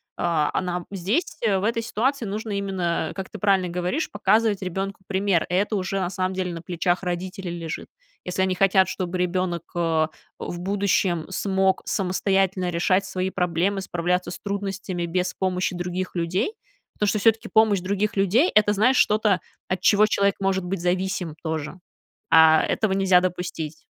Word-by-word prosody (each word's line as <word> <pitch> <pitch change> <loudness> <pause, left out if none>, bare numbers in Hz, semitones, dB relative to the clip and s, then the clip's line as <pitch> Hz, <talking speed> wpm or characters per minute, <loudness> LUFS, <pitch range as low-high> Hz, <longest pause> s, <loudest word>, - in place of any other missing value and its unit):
А, 165 -4 +1
а - - +1
нам 180 -1 -3
здесь, 200 - -1
э, 205 -4 +2
в 190 - -3
этой 230 +1 0
ситуации 245 +3 -1
нужно 215 +2 -4
именно, 185 -5 -1
как 190 -1 -5
ты 215 - -8
правильно 195 -2 +2
говоришь, 180 - -2
показывать 215 0 +2
ребёнку 190 +1 -4
пример. 190 -3 +1
Это 200 +4 +1
уже, 195 0 -1
на 180 -1 -1
самом 185 0 -2
деле, 185 -2 -2
на 165 - -6
плечах 175 +1 -1
родителей 185 +1 -4
лежит. 165 -2 -5 0.4
Если 180 +1 -2
они 190 0 +1
хотят, 190 -1 +4
чтобы 185 -1 -3
ребёнок, 180 -1 -1
э, 165 -2 +1 0.3
в 175 - -5
будущем 190 -3 0
смог 190 0 +1
самостоятельно 190 -3 0
решать 185 +3 +1
свои 185 0 -2
проблемы, 180 +2 0
справляться 180 0 -1
с - - -7
трудностями 195 -3 -3
без 180 +1 -1
помощи 185 -1 -1
других 180 +1 -4
людей. 180 - -1 0.4
Потому 210 - -1
что 210 - +2
всё-таки 225 +1 +2
помощь 220 -3 +4
других 200 +3 -1
людей- 205 - +3
это, 210 -1 +5
знаешь, 235 +6 +3
что-то, 210 -4 +3 0.3
от 185 0 -2
чего 210 +2 +5
человек 200 -2 +2
может 190 -1 0
быть 190 +1 -3
зависим 180 -2 -1
тоже. 160 +2 -4 0.5
А 160 -1 +7
этого 220 -3 0
нельзя 190 -2 +4
допустить, 175 -4 -4
185 Hz, 165 wpm, -24 LUFS, 175-200 Hz, 0.5 s, А